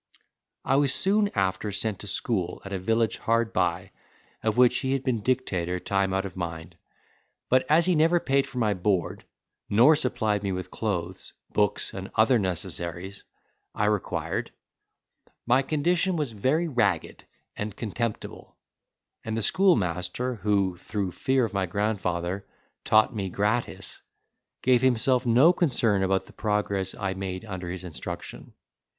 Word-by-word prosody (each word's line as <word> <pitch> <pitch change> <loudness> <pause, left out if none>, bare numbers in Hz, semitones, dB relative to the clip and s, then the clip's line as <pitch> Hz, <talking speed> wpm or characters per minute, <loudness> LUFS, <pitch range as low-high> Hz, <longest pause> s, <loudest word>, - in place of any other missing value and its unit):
I 135 - +3
was 140 -2 +3
soon 205 +2 +3
after 95 +1 0
sent 100 0 -3
to 105 - -9
school 95 -3 -1
at 100 - -6
a 95 - -2
village 110 +4 0
hard 115 0 +1
by, 90 +2 0 0.5
of 110 +1 -1
which 125 -1 +5
he 130 0 -1
had 135 -1 -1
been 125 -5 0
dictator 95 -8 -1
time 95 +1 0
out 95 +1 0
of 95 - -7
mind; 80 -3 -6 0.7
but 130 0 +3
as 160 +2 +5
he 185 - +3
never 165 +2 +4
paid 135 -3 +1
for - - -10
my 110 -4 +2
board, 95 -1 -1 0.4
nor 120 +10 +6
supplied 110 -7 0
me 100 -1 -2
with 90 -1 -5
clothes, 95 -4 -4 0.2
books, 105 -1 0
and 95 0 -6
other 115 +2 +4
necessaries 90 0 -4 0.5
I 105 - +1
required, 105 -2 -1 1.0
my 125 +3 +4
condition 175 +6 +1
was 150 -6 -1
very 135 +11 0
ragged 100 - -1 0.3
and 105 -1 -5
contemptible, 115 0 -5 0.7
and 110 0 -3
the 115 - -1
schoolmaster, 115 - +1
who, 100 -2 0
through 100 0 -3
fear 130 +7 +1
of 110 - -6
my 95 -1 0
grandfather, 95 -2 -2 0.4
taught 110 +1 +3
me 100 -3 -2
gratis, 105 -1 -2 0.6
gave 125 -1 +4
himself 125 0 +2
no 130 +9 +6
concern 120 - +1
about 95 0 +1
the - - -17
progress 100 -3 -1
I 100 -2 -2
made 95 +1 -5
under 95 -4 -6
his 90 0 -6
instruction. 90 -4 -7
105 Hz, 150 wpm, -26 LUFS, 95-125 Hz, 1.0 s, nor